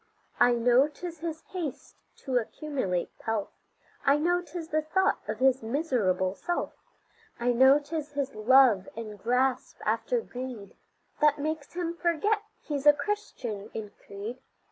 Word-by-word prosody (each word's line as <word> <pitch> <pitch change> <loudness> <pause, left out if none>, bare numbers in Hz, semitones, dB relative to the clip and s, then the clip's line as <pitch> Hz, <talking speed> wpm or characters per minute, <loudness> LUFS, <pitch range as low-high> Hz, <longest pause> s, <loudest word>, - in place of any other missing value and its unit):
I 245 - +6
know 245 +4 +4
'tis 335 +2 -8
his 325 -1 -5
haste 340 -7 -5 0.3
to 260 -2 +1
accumulate 235 - -3
pelf, 225 -2 -2 0.5
I 280 +1 +5
know 350 +4 +2
'tis 335 -1 -7
the 310 +1 +1
thought 335 +5 +1
of 215 0 -2
his 265 +2 +3
miserable 220 - 0
self. 350 - -3 0.7
I 245 +1 +2
know 265 +3 +7
'tis 295 0 -5
his 280 -1 -2
love 220 -3 +5
and 215 -3 -7
grasp 250 +4 0
after - - +1
greed 250 - -7 0.4
That 300 0 +4
makes 300 0 -3
him 340 -1 -2
forget 345 +5 +1 0.2
he's 290 -1 -2
a 295 - +10
Christian 245 - -4
in 210 -2 -5
creed. 205 +5 -8
270 Hz, 145 wpm, -28 LUFS, 230-315 Hz, 0.7 s, a